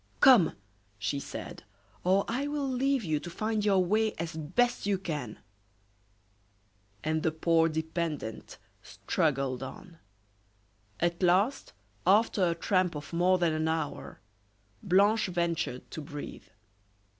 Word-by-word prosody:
"Come!" 250 - +6 0.4
she 105 +8 -2
said, - - -7 0.4
"or 190 +2 +3
I 260 +5 -1
will 290 -1 -2
leave 265 0 +1
you 155 -4 0
to 175 - -8
find 215 +4 -2
your 195 -3 +3
way 215 +3 +1
as 165 0 -5
best 205 +10 0
you 200 -1 +2
can." 150 - -5 1.7
And 155 +1 0
the 160 - +2
poor 165 +1 +2
dependent 160 -6 -4 0.2
struggled 135 -4 -1
on. 165 +5 -9 1.0
At 170 +1 0
last, 190 +9 +2 0.3
after 205 0 +4
a 170 - -1
tramp 185 0 +1
of 150 +2 -8
more 180 +2 +3
than 170 -3 +1
an 155 0 0
hour, 160 -2 -3 0.6
Blanche 200 +4 +3
ventured 170 -7 -2
to 155 - -5
breathe. 145 0 -8
175 Hz, 125 wpm, -29 LUFS, 155-205 Hz, 1.7 s, Come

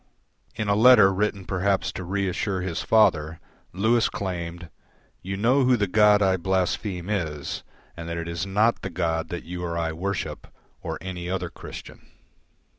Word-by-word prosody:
In 110 - -3
a 100 - +3
letter 110 -3 +7
written 100 -1 -1
perhaps 95 +1 0
to 95 - -6
reassure 95 +1 -1
his 90 -2 -3
father, 80 -8 +3 0.3
Lewis 110 +5 +2
claimed, 85 -3 -5 0.5
"You 95 +1 -4
know 125 +7 +3
who 125 -1 +4
the 105 - +1
God 105 +1 +4
I 95 -1 +3
blaspheme 95 0 -1
is 80 -8 -3 0.3
and 85 0 -7
that 85 - -3
it 85 0 -4
is 85 0 -3
not 105 +4 +1
the - - -4
God 80 -2 -2
that 85 - -5
you 90 +1 -6
or 85 -1 -3
I 80 -1 -1
worship, 95 +3 -4 0.3
or - - -4
any 90 -2 -5
other 90 -2 -3
Christian." - - -11
95 Hz, 165 wpm, -25 LUFS, 85-100 Hz, 0.5 s, letter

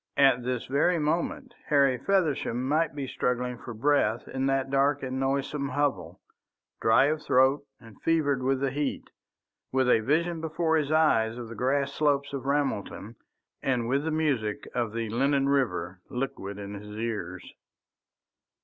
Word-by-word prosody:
At 135 -3 +5
this 125 -1 -2
very 150 +6 +2
moment 160 +2 -1
Harry 140 -4 +3
Feversham 145 -9 0
might 155 0 +1
be 140 -2 -3
struggling 125 -1 -2
for 120 - -8
breath 120 -1 +1
in 135 0 -2
that 135 0 0
dark 140 +1 +2
and 130 0 -3
noisome 140 +1 -1
hovel, 130 - -1 0.6
dry 115 +4 +5
of 155 +1 0
throat 135 +2 +3
and 115 -3 -16
fevered 145 -5 +1
with 130 +1 0
the 135 -1 0
heat, 145 +1 -3 0.6
with 130 -1 +2
a 125 - +5
vision 160 +7 0
before 160 0 0
his 150 -2 0
eyes 120 -8 +3
of 120 -2 -7
the - - -7
grass 140 +4 0
slopes 140 -1 +1
of 135 -1 -4
Ramelton 120 -6 -2 0.5
and 125 -3 0
with 135 +4 +1
the 160 - -1
music 140 -6 -1
of 120 -3 -1
the 115 0 -3
Lennon 135 +4 +1
River 95 -10 0
liquid 125 -7 -4
in 100 0 -7
his 105 +1 -8
ears. 115 -1 -5
135 Hz, 160 wpm, -27 LUFS, 120-145 Hz, 0.6 s, At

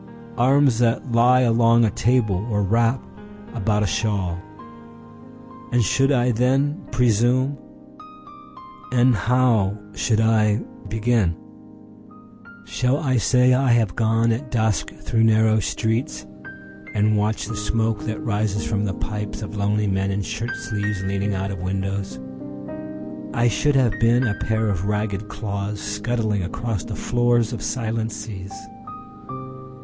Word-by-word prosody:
Arms 130 -1 +4
that 120 +1 +1
lie 125 +2 +5
along 115 -1 +4
a 105 - +1
table, 105 -5 +1
or 105 -2 +1
wrap 115 +5 +2 0.5
about 105 -2 0
a - - +1
shawl. 95 -2 -1 1.3
And 120 -1 +3
should 135 +8 +2
I 125 -2 +3
then 135 +6 +1
presume? 125 +3 +2 1.4
And 125 0 +4
how 115 -2 +2 0.2
should 110 +1 +1
I 110 -2 +3 0.3
begin?……..Shall 145 - -3
I 135 -5 0
say, 125 +2 +4
I 130 +1 +2
have 110 -6 +1
gone 115 0 +2
at 120 +7 -3
dusk 110 -3 0
through 115 -1 -1
narrow 110 0 +4
streetsAnd 110 - -3
watched 105 +1 0
the 115 - -4
smoke 105 +1 0
that 110 0 -4
rises 105 -1 -1
from 105 -1 -1
the 100 - -2
pipesOf 105 0 -5
lonely 105 +1 0
men 95 0 0
in 100 +1 -1
shirt 115 +3 -4
sleeves, 105 -3 -3
leaning 100 +1 -1
out 95 +1 -2
of 95 -2 -6
windows?…I 95 - -5
should 145 +7 +1
have 125 -5 +3
been 120 +2 +4
a 110 - +1
pair 110 +1 -1
of 95 -2 -1
ragged 105 0 -2
clawsScuttling 105 +1 -2
across 110 0 -3
the - - -6
floors 120 -1 +1
of 115 - -5
silent 115 -2 -2
seas. 105 -3 -7
110 Hz, 125 wpm, -22 LUFS, 105-120 Hz, 1.4 s, lie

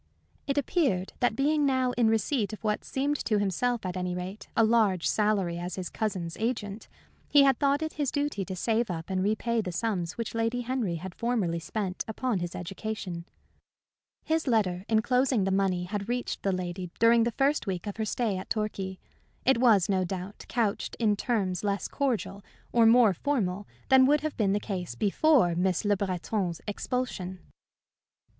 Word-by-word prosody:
It 280 0 -1
appeared 270 - +1
that 245 -3 +2
being 295 +4 +2
now 260 -2 +2
in 240 -2 +2
receipt 220 0 +1
of 215 - -9
what 210 -1 0
seemed 285 +2 -1
to 215 - +1
himself, 205 +4 0
at 180 0 -3
any 180 -1 -2
rate, 185 +3 -6
a 225 - +6
large 215 -6 +3
salary 200 -5 +1
as 175 0 -4
his 185 -2 -5
cousin's 185 -7 -3
agent, 220 -2 -3 0.4
he 290 -1 +7
had 270 -1 +3
thought 285 +1 +2
it 315 - -3
his 290 -3 -1
duty 285 -8 -1
to 190 - -5
save 225 +4 0
up 165 +1 -5
and 185 0 0
repay 220 +3 +1
the 185 -4 -4
sums 180 -3 -2
which 230 -1 -5
Lady 230 +2 0
Henry 240 -7 -1
had 180 +2 -6
formerly 210 -8 -1
spent 185 +2 -3
upon 225 -1 -1
his 175 0 -4
education. 185 -1 -5 1.0
His 320 -1 0
letter 195 -6 +1
enclosing 245 +1 +2
the 195 - 0
money 190 -2 +1
had 200 +3 -4
reached 245 0 -2
that 195 -2 0
lady 180 0 -4
during 230 0 +5
the 235 - 0
first 280 -3 +1
week 185 -3 -3
of 205 0 -5
her 220 - -1
stay 215 -3 -1
at - - -9
Torquay. 195 -3 -2 0.5
It 260 -2 +4
was, 220 -8 +5
no 190 -2 +1
doubt, 185 +2 -6
couched 225 -4 -1
in 215 -3 +2
terms 195 -5 -1
less 200 -1 -1
cordial 240 -7 -2 0.3
or 230 -2 +5
more 230 -3 +6
formal 205 - -1 0.2
than 260 -1 +7
would 295 +1 +4
have 310 -1 -3
been 200 -3 +1
the 205 - +1
case 180 - -4
before 210 - +3
Miss 180 +3 0
Le 205 0 +3
Breton's 185 -2 -2
expulsion. 210 -4 -3
210 Hz, 180 wpm, -28 LUFS, 185-245 Hz, 1.0 s, he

